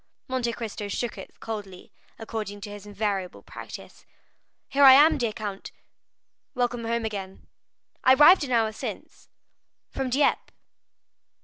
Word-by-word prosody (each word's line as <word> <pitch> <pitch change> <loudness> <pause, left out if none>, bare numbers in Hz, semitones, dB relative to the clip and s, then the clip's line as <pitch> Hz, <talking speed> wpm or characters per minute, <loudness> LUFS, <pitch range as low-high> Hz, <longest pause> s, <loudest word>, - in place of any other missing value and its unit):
Monte 255 -3 -1
Cristo 215 -3 -6
shook 235 +3 -3
it - - -12
coldly, 205 -5 -7 0.3
according 220 -2 -6
to 205 0 -7
his 205 0 -10
invariable 200 -3 -3
practice. - - -11 0.6
"Here 280 +1 +2
I 265 -1 +11
am, 295 +2 +6
dear 235 -3 0
count." 205 -2 -7 0.8
"Welcome 245 -1 -1
home 230 0 -1
again." 195 -3 -6 0.6
"I 260 - +6
arrived 300 +5 +7
an 265 - -5
hour 225 -2 +2
since." 220 - -8 0.6
"From 265 -1 -3
Dieppe?" 275 +4 +1
225 Hz, 130 wpm, -26 LUFS, 205-255 Hz, 0.8 s, I